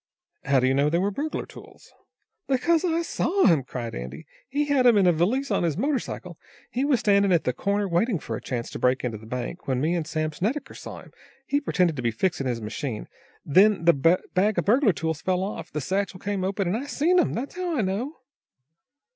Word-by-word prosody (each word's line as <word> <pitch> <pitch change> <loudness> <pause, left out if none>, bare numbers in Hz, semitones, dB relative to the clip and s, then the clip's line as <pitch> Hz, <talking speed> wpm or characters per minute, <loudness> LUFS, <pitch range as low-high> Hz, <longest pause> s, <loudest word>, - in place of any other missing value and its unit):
"How 135 -1 +3
do 130 - +1
you 130 - +3
know 140 +2 +3
they 165 - +1
were 195 +3 +1
burglar 300 +9 -3
tools?" - - -15 0.5
"Because 320 +5 +2
I 335 -1 +1
saw 375 +3 +1
'em!" 165 -7 +4
cried 120 -2 -6
Andy. 65 +5 -7 0.2
"He 290 +3 0
had 280 -3 +3
'em 235 -3 +6
in 195 - +4
a 180 - +6
valise 220 - 0
on - - +2
his 170 -3 0
motor 275 +4 +1
cycle. 180 -6 -8 0.3
He 255 - -1
was 280 -4 +2
standing 200 -2 +3
at 170 -2 +3
the 125 - 0
corner, 200 +8 -1
waiting 190 +4 +1
for - - -5
a - - -6
chance 120 -3 -4
to - - -6
break 125 +1 +2
into 115 -4 -3
the 110 - -13
bank, 125 +8 -4
and - - -28
when 130 -2 0
me 155 +5 +1
and 165 -3 -2
Sam 155 -1 -1
Snedecker 225 - -3
saw - - -8
him, - - -17 0.3
he 285 +2 0
pretended 180 - +1
to - - -2
be 120 - +1
fixin' 135 +4 -1
his 120 -2 -1
machine. 110 +1 -4 0.4
Then 190 +3 +4
the 170 - +7
bag 185 +7 +2
of 175 - +1
burglar 235 +2 +4
tools 160 -2 -3
fell 185 0 0
off, 200 - -5
the 150 - -3
satchel 190 +4 -2
came 200 -1 -2
open, 195 0 -1
and 180 - 0
I 265 +5 -4
seen 335 +6 +2
'em! 350 - +1
That's 265 +8 -5
how 355 -3 -2
I - - +2
know." 215 +10 -2
185 Hz, 230 wpm, -25 LUFS, 150-250 Hz, 0.5 s, the